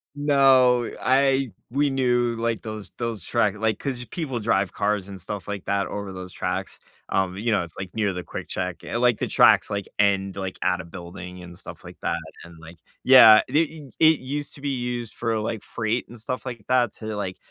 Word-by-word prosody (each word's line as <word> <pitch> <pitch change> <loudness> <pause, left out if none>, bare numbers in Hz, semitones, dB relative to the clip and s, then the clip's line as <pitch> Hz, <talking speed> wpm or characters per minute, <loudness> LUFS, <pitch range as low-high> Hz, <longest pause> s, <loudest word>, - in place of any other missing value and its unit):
No, 135 -4 +4
I 135 -1 +2 0.2
we 140 +3 +1
knew, 120 -3 +1
like, 115 0 -2
those 110 -2 -7
those 115 -6 -3
track 105 -4 +1
like, 110 -1 0
'cause 130 -3 -4
people 135 -7 -4
drive 100 -4 +1
cars 105 -2 -1
and 95 -1 -9
stuff 100 0 -6
like 100 -2 -5
that 100 -1 0
over 100 -2 -5
those 95 -1 -8
tracks. - - -3 0.3
Um, 95 -1 0
you 115 +2 -1
know, 105 - +2
it's, 80 - -11
like, 95 -1 -6
near 105 -3 0
the 90 0 -5
quick - - -7
check 90 -1 -4
eh, - - -3
like, 120 -2 +3
the - - -1
tracks, - - +5
like, 100 -1 -3
end, 100 -1 +2
like, 95 -1 -5
at 90 +1 +1
a - - -11
building 90 +1 -9
and 85 0 -11
stuff - - -11
like - - -11
that, 85 - -1 0.3
and, 85 0 -13
like 85 +1 -13 0.3
yeah, 115 -5 +9
it 135 - -6
it 155 -3 -1
it 160 -1 +6
used 145 +3 -4
to 140 - -13
be 145 - -2
used 120 -3 -3
for, 115 -2 -1
like, 110 0 -3
freight 115 +2 -2
and 120 -1 -11
stuff 125 +4 -4
like 120 -5 -7
that 125 -3 +3
to, 110 -1 -5
like, 95 -2 -4
110 Hz, 215 wpm, -24 LUFS, 95-125 Hz, 0.3 s, yeah